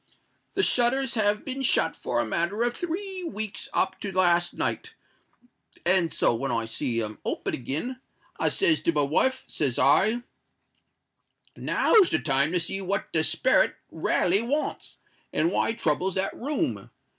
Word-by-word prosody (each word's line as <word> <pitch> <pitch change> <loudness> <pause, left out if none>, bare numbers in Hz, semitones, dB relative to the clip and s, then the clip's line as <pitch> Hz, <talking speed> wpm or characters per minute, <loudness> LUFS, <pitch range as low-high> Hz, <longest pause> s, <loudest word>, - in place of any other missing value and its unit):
"The 400 - +2
shutters 250 -1 +3
has 210 -2 +1
been 270 0 -5
shut 240 -10 +1
for 120 - -2
a 120 - +1
matter 170 - -1
of 240 0 0
three 370 +2 -4
weeks 215 - -4
up - - 0
to 200 - -5
last 175 -2 +2
night; - - -2 0.9
and 175 -2 +3
so - - +2
when 135 +4 -2
I 115 -1 -1
see 115 0 -2
'em 105 -1 -7
open - - -3
agen, 160 - -4 0.4
I - - +2
says 345 -5 +2
to - - +2
my 145 -2 +2
wife, 255 - +1
says 135 -5 -1
I, 215 +11 +4 1.3
'_Now's 410 -6 +3
the - - +2
time 140 +1 +1
to 180 - +2
see 180 +4 -2
what 195 +1 -3
the 160 - +2
sperret 260 - +3 0.2
raly 190 +4 +1
wants, 280 +6 -3 0.3
and 160 +3 +1
why - - +1
he 225 - -2
troubles 180 0 0
that 190 0 -2
room. 285 +5 -3
195 Hz, 160 wpm, -26 LUFS, 155-255 Hz, 1.3 s, I